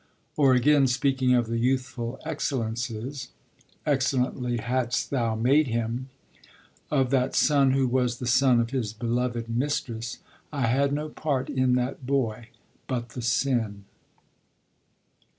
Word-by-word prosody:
Or, 135 Hz, -4 st, +4 dB
again, 140 Hz, +2 st, +4 dB
speaking 130 Hz, 0 st, +2 dB
of 120 Hz, -1 st, +2 dB
the 115 Hz, +1 st, -2 dB
youthful 130 Hz, -1 st, -1 dB
excellences 125 Hz, -2 st, -3 dB, 0.6 s
('excellently 130 Hz, -3 st, 0 dB
hadst 120 Hz, +1 st, -1 dB
Thou 115 Hz, -5 st, 0 dB
made 135 Hz, +7 st, +3 dB
him') 115 Hz, +2 st, -2 dB, 0.8 s
of 135 Hz, -4 st, +1 dB
that 130 Hz, -1 st, +1 dB
son 140 Hz, -3 st, +4 dB
who 135 Hz, -1 st, +2 dB
was 125 Hz, -1 st, 0 dB
the 125 Hz, -, -5 dB
son 130 Hz, 0 st, +4 dB
of 115 Hz, 0 st, -1 dB
his 120 Hz, -6 st, -2 dB
beloved 120 Hz, +1 st, -2 dB
mistress: 120 Hz, -2 st, -2 dB, 0.3 s
'I 140 Hz, -5 st, -1 dB
had 135 Hz, +4 st, +2 dB
no 150 Hz, +2 st, -2 dB
part 140 Hz, -4 st, -2 dB
in 130 Hz, -1 st, +2 dB
that 125 Hz, +1 st, -2 dB
boy, 120 Hz, -4 st, -1 dB, 0.4 s
but 120 Hz, -2 st, -3 dB
the 125 Hz, -, -7 dB
sin.' 115 Hz, -4 st, 0 dB
125 Hz, 130 wpm, -26 LUFS, 120-135 Hz, 0.8 s, Or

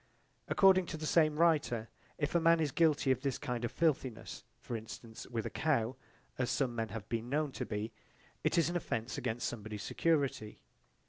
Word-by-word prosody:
According 190 Hz, -2 st, +5 dB
to 160 Hz, -, -4 dB
the 155 Hz, -, -5 dB
same 155 Hz, -1 st, +4 dB
writer, 150 Hz, -9 st, +2 dB, 0.3 s
if 145 Hz, -1 st, -1 dB
a 170 Hz, -, +4 dB
man 165 Hz, 0 st, +5 dB
is 155 Hz, -3 st, +1 dB
guilty 150 Hz, -3 st, +3 dB
of 130 Hz, -1 st, +1 dB
this 135 Hz, -2 st, -1 dB
kind 120 Hz, -1 st, -3 dB
of 120 Hz, -, -1 dB
filthiness, 130 Hz, -8 st, -1 dB, 0.2 s
for 120 Hz, -, -5 dB
instance, 115 Hz, +1 st, -8 dB
with 115 Hz, -3 st, -3 dB
a -, -, -3 dB
cow, 130 Hz, -6 st, +1 dB, 0.4 s
as 125 Hz, -, +1 dB
some 130 Hz, -4 st, 0 dB
men 115 Hz, -1 st, -2 dB
have 105 Hz, 0 st, -6 dB
been 115 Hz, +1 st, -3 dB
known 150 Hz, +1 st, 0 dB
to -, -, -5 dB
be, 105 Hz, +1 st, -3 dB, 0.5 s
it -, -, +2 dB
is 165 Hz, -, +4 dB
an 175 Hz, -, -2 dB
offence 115 Hz, -8 st, -2 dB
against 120 Hz, -1 st, -2 dB
somebody's 105 Hz, -2 st, -5 dB
security. 140 Hz, -6 st, 0 dB
130 Hz, 190 wpm, -34 LUFS, 115-155 Hz, 0.5 s, According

